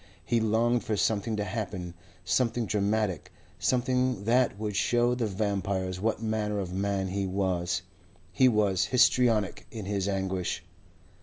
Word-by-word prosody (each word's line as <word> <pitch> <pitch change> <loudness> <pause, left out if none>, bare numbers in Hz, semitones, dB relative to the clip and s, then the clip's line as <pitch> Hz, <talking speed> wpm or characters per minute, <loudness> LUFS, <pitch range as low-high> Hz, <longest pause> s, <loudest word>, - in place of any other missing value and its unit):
He 120 - +2
longed 115 +2 +2
for 105 -1 -1
something 110 +2 0
to 105 - -1
happen, 95 -4 -4 0.3
something 115 +4 +1
dramatic, 105 -3 -1 0.3
something 125 -3 +1
that 120 -1 +2
would 105 -1 -3
show 120 +3 +2
the 120 -3 -1
vampires 95 -2 -2
what 115 +1 -1
manner 110 -1 -1
of 95 -3 -3
man 95 0 -1
he 95 +1 -1
was. 90 -2 -1 0.5
He 130 -1 +5
was 105 -5 +2
histrionic 120 -5 +2
in 110 -4 -7
his 100 -1 -1
anguish. 95 -2 -2
105 Hz, 140 wpm, -28 LUFS, 95-115 Hz, 0.5 s, He